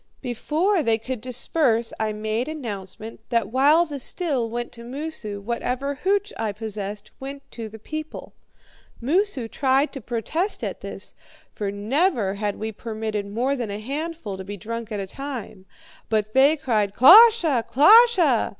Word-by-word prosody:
"Before 310 Hz, -, 0 dB
they 230 Hz, -5 st, +2 dB
could 250 Hz, +1 st, -5 dB
disperse 250 Hz, -1 st, +1 dB
I 220 Hz, -1 st, 0 dB
made 215 Hz, +3 st, -2 dB
announcement 220 Hz, -7 st, -7 dB
that 230 Hz, -4 st, 0 dB
while 290 Hz, +7 st, +4 dB
the 290 Hz, -3 st, -6 dB
still 265 Hz, -5 st, -1 dB
went 240 Hz, +1 st, -4 dB
to 235 Hz, -, -12 dB
Moosu, 250 Hz, -5 st, -6 dB
whatever 245 Hz, +6 st, -2 dB
hooch 400 Hz, +8 st, 0 dB
I 220 Hz, -2 st, -2 dB
possessed 210 Hz, -1 st, -6 dB
went 275 Hz, +1 st, -7 dB
to 225 Hz, -2 st, -7 dB
the 220 Hz, -, -11 dB
people. 310 Hz, +7 st, -7 dB, 0.7 s
Moosu 295 Hz, -, 0 dB
tried 270 Hz, +4 st, +1 dB
to 270 Hz, -, -7 dB
protest 285 Hz, -, -2 dB
at -, -, -4 dB
this, -, -, -6 dB, 0.4 s
for 205 Hz, -2 st, -3 dB
never 220 Hz, -, 0 dB
had 205 Hz, 0 st, -2 dB
we 220 Hz, +1 st, -4 dB
permitted 215 Hz, -1 st, -4 dB
more 245 Hz, +7 st, -1 dB
than 240 Hz, -5 st, -4 dB
a 200 Hz, -, -4 dB
handful 280 Hz, -, -5 dB
to 190 Hz, -, -7 dB
be 205 Hz, +2 st, -7 dB
drunk 230 Hz, +3 st, -6 dB
at 210 Hz, -, -3 dB
a 195 Hz, -, -3 dB
time; 225 Hz, -5 st, -7 dB, 0.4 s
but 215 Hz, -1 st, 0 dB
they 280 Hz, +4 st, +5 dB
cried, 215 Hz, -7 st, 0 dB
'KLOSHE! 340 Hz, -, +7 dB
KLOSHE!' 355 Hz, -, +6 dB
240 Hz, 155 wpm, -23 LUFS, 215-295 Hz, 0.7 s, KLOSHE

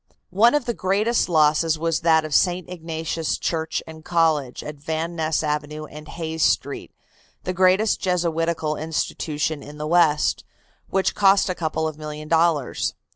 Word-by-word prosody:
One 230 Hz, +9 st, +5 dB
of 295 Hz, -4 st, 0 dB
the 235 Hz, -, -1 dB
great 195 Hz, +1 st, 0 dB, 0.2 s
losses 155 Hz, 0 st, +3 dB
was 165 Hz, 0 st, 0 dB
that 160 Hz, -2 st, +3 dB
of 155 Hz, -, -5 dB
St. 180 Hz, +1 st, +2 dB
Ignatius' 165 Hz, -2 st, -3 dB
Church 160 Hz, -1 st, -2 dB
and 160 Hz, -1 st, -11 dB
College, 160 Hz, -7 st, +1 dB
at 150 Hz, 0 st, -7 dB
Van 160 Hz, +3 st, -3 dB
Ness 160 Hz, -1 st, 0 dB
Avenue 150 Hz, 0 st, -3 dB
and 150 Hz, 0 st, -11 dB
Hayes 160 Hz, -1 st, -5 dB
Street, -, -, 0 dB, 0.5 s
the 185 Hz, -, -2 dB
greatest 185 Hz, +4 st, +3 dB
Jesuitical 165 Hz, -3 st, 0 dB
institution 155 Hz, -1 st, -2 dB
in 145 Hz, +1 st, -11 dB
the 150 Hz, -, -4 dB
west, 155 Hz, -2 st, +2 dB, 0.5 s
which 195 Hz, 0 st, +1 dB
cost 195 Hz, 0 st, +4 dB
a -, -, +1 dB
couple 160 Hz, -2 st, -2 dB
of 155 Hz, -1 st, -7 dB
millions 150 Hz, 0 st, -7 dB
of -, -, -19 dB
dollars. 165 Hz, -5 st, +1 dB
160 Hz, 160 wpm, -23 LUFS, 155-175 Hz, 0.5 s, One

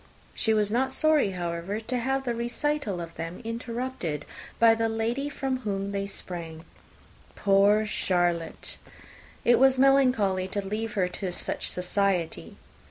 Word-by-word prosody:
She 220 Hz, -, 0 dB
was 210 Hz, -1 st, +2 dB
not 260 Hz, +3 st, +1 dB
sorry, 310 Hz, -6 st, +3 dB
however, 175 Hz, +3 st, -3 dB
to 245 Hz, +3 st, -3 dB
have 270 Hz, +2 st, 0 dB
the 245 Hz, -2 st, -1 dB
recital 240 Hz, -2 st, -1 dB
of 170 Hz, -1 st, -6 dB
them 165 Hz, +2 st, -5 dB
interrupted 230 Hz, -, -4 dB, 0.3 s
by 230 Hz, -1 st, +6 dB
the 225 Hz, 0 st, 0 dB
entrance -, -, +3 dB
of 225 Hz, -, -3 dB
the -, -, -4 dB
lady 240 Hz, +6 st, -1 dB
from 270 Hz, -2 st, -2 dB
whom 200 Hz, -4 st, -3 dB
they 200 Hz, 0 st, -2 dB
sprang. 170 Hz, -4 st, -6 dB, 0.7 s
Poor 200 Hz, +2 st, +4 dB
Charlotte! 175 Hz, -5 st, -1 dB, 0.7 s
it 240 Hz, -, +5 dB
was 265 Hz, 0 st, +5 dB
melancholy 250 Hz, -9 st, +3 dB
to 195 Hz, 0 st, -3 dB
leave 220 Hz, +2 st, -3 dB
her 185 Hz, -3 st, +1 dB
to 180 Hz, +1 st, -4 dB
such -, -, -3 dB
society! 180 Hz, -, -1 dB
210 Hz, 155 wpm, -27 LUFS, 180-245 Hz, 0.7 s, by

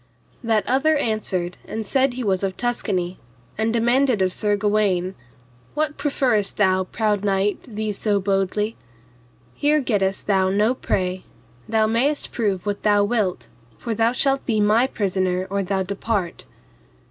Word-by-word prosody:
That 225 Hz, -2 st, +1 dB
other 295 Hz, +5 st, +3 dB
answered 195 Hz, -8 st, -2 dB
and 220 Hz, 0 st, -4 dB
said 265 Hz, +3 st, +2 dB
he 255 Hz, -, -3 dB
was 190 Hz, -4 st, +1 dB
of 195 Hz, -1 st, -2 dB
Tuscany, 190 Hz, -7 st, -2 dB, 0.4 s
and 220 Hz, +1 st, 0 dB
demanded 240 Hz, +1 st, +2 dB
of 185 Hz, -1 st, 0 dB
Sir 210 Hz, -1 st, +1 dB
Gawaine, 200 Hz, -3 st, +1 dB, 0.6 s
What, 300 Hz, 0 st, 0 dB
profferest 260 Hz, -8 st, 0 dB
thou, 190 Hz, -2 st, +3 dB
proud 210 Hz, 0 st, -1 dB
knight, 200 Hz, 0 st, +1 dB
thee 215 Hz, -2 st, -3 dB
so 205 Hz, 0 st, 0 dB
boldly? 195 Hz, +2 st, 0 dB, 0.8 s
here 300 Hz, -, +2 dB
gettest 200 Hz, -7 st, 0 dB
thou 190 Hz, -2 st, +2 dB
no 210 Hz, +5 st, +2 dB
prey, 185 Hz, -7 st, -2 dB, 0.5 s
thou 220 Hz, -1 st, +3 dB
mayest 250 Hz, +7 st, 0 dB
prove 200 Hz, -6 st, -1 dB
what 205 Hz, -1 st, -2 dB
thou 205 Hz, -1 st, +3 dB
wilt, 205 Hz, -, -1 dB, 0.3 s
for 230 Hz, -, -3 dB
thou 225 Hz, +2 st, +2 dB
shalt 270 Hz, +2 st, +1 dB
be 220 Hz, -3 st, +1 dB
my 215 Hz, +4 st, +4 dB
prisoner 185 Hz, -4 st, -1 dB
or 200 Hz, 0 st, 0 dB
thou 190 Hz, 0 st, -1 dB
depart. 200 Hz, -1 st, -3 dB
210 Hz, 145 wpm, -22 LUFS, 190-235 Hz, 0.8 s, my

